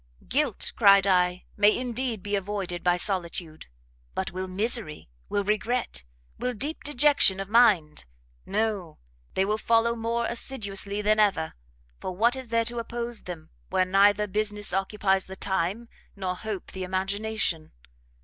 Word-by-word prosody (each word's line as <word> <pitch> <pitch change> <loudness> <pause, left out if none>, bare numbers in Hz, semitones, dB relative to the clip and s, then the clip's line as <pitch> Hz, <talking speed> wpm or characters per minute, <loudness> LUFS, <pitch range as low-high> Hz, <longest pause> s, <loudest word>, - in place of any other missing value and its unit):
"Guilt, 275 -5 0
cried 200 -2 +6
I, 180 -1 +2
may, 205 +1 +4
indeed, 245 -4 -3
be 205 0 -1
avoided 195 -3 -3
by 180 0 +3
solitude; 175 -4 -3 0.5
but - - -2
will 185 +1 -4
misery? 195 - -1 0.2
will 205 - 0
regret? 215 - -1 0.3
will 250 -1 -2
deep 290 +9 -3
dejection 285 -8 +4
of 195 - -4
mind? 195 - +4 0.4
no, 205 -6 -2 0.4
they 190 - +2
will 210 +2 0
follow 230 +1 +2
more 235 +1 -1
assiduously 205 -4 -3
than 215 +1 +3
ever; 195 -7 +2 0.5
for 185 - -4
what 235 +6 +3
is 260 -1 -7
there 230 0 +1
to 240 +1 -3
oppose 235 0 -4
them, 170 -3 -8 0.2
where 185 - +2
neither 200 +2 +4
business 210 -1 -1
occupies 195 0 +1
the 190 - -8
time, 190 +4 -2 0.3
nor 185 -2 -3
hope 210 0 -5
the 190 - -5
imagination? 190 -2 -2
205 Hz, 145 wpm, -27 LUFS, 185-230 Hz, 0.5 s, cried